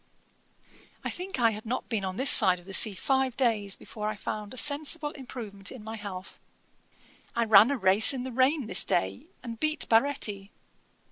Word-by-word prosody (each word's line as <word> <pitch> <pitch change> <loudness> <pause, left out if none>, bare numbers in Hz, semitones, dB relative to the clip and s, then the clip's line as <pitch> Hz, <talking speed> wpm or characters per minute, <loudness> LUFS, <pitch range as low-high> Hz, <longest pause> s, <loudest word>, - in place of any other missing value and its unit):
'I - - -4
think 365 -5 -7
I 230 -2 +3
had 215 0 -8
not 245 +3 -5
been 220 -5 -3
on 190 0 -5
this 265 +1 +5
side 185 -1 +7
of 175 - -16
the 195 - -10
sea 210 0 +3
five 265 +4 -1
days 215 -6 0
before 210 -1 -7
I 215 - -5
found 210 0 -7
a 255 - -11
sensible 295 +2 +1
improvement 225 -8 -8
in 255 -5 -11
my 220 +1 -8
health. 200 -3 -9 1.0
I 235 0 0
ran 215 +1 +6
a 280 - -2
race 195 +1 +5
in 260 -3 -4
the 260 - -7
rain 260 +3 +1
this 190 -3 +2
day, 95 +1 -3 0.2
and 230 -2 -8
beat 310 +2 -2
Baretti. 225 -5 0
225 Hz, 190 wpm, -27 LUFS, 200-265 Hz, 1.0 s, side